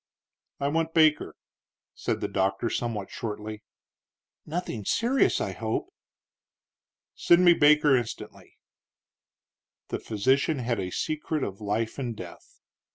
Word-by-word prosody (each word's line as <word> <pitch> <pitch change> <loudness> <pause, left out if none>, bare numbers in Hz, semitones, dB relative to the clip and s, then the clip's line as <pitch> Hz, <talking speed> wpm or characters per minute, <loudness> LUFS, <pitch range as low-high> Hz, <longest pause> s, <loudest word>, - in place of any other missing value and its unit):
"I 140 - 0
want 165 +2 -1
Baker," 155 -2 +3 0.6
said - - -3
the - - -1
doctor, 95 +4 0
somewhat 110 -5 -3
shortly. 105 -1 -6 0.9
"Nothing 155 - -4
serious, 240 - +2
I - - -2
hope." 385 +1 -3 1.2
"Send 175 +1 +4
me 175 - +8
Baker 150 -2 +5
instantly." 120 -3 -5 1.3
The - - -3
physician 130 +8 +1
had 120 -3 -1
a 90 -1 -3
secret 155 - -2
of 100 +1 -5
life 110 +4 -2
and 120 -4 -3
death. 90 -4 -12
125 Hz, 115 wpm, -27 LUFS, 105-155 Hz, 1.3 s, me